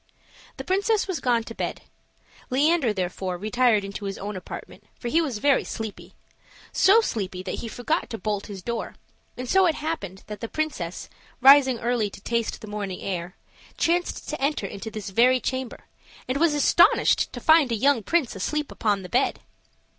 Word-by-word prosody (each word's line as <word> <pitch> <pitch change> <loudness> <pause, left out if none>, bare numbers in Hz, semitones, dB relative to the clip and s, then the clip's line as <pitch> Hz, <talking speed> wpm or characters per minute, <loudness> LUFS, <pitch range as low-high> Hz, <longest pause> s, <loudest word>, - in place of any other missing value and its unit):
The - - -5
princess 405 +3 +1
was 375 -4 -2
gone 240 -2 +1
to 230 - -8
bed. - - -4 0.7
Leander, 285 -1 +3
therefore, 185 -1 -3
retired 215 +2 +2
into 200 +1 -6
his 195 0 -4
own 205 +1 -5
apartment, 185 - -9
for 240 - -4
he 325 +6 +3
was 275 -9 -2
very 275 +5 +3
sleepy 220 -2 -7 0.6
so 400 +4 +5
sleepy 190 - -3
that 185 - -4
he 235 - -5
forgot 245 +1 -2
to 225 - -4
bolt 205 +1 -3
his 195 -3 -8
door; 235 -1 -4 0.4
and 250 0 -5
so 380 +6 +4
it 320 - +1
happened 245 - -5
that 210 -1 -8
the 230 - -4
princess, 225 - -4 0.3
rising 265 -1 +7
early 235 -2 0
to 200 - -12
taste 230 +1 -2
the 215 - -9
morning 205 -3 -5
air, 180 -1 -4 0.4
chanced 350 +1 0
to 305 - -4
enter 280 -6 0
into 200 +3 -6
this 215 -3 -6
very 250 +5 +4
chamber, 260 0 -4 0.4
and 260 +2 -1
was 325 -2 +3
astonished 290 - +4
to - - -5
find 315 -5 +5
a - - +2
young 265 +2 +3
prince 290 - 0
asleep 300 +10 -2
upon 205 -3 0
the - - -7
bed. 255 +7 +1
235 Hz, 180 wpm, -25 LUFS, 200-290 Hz, 0.7 s, rising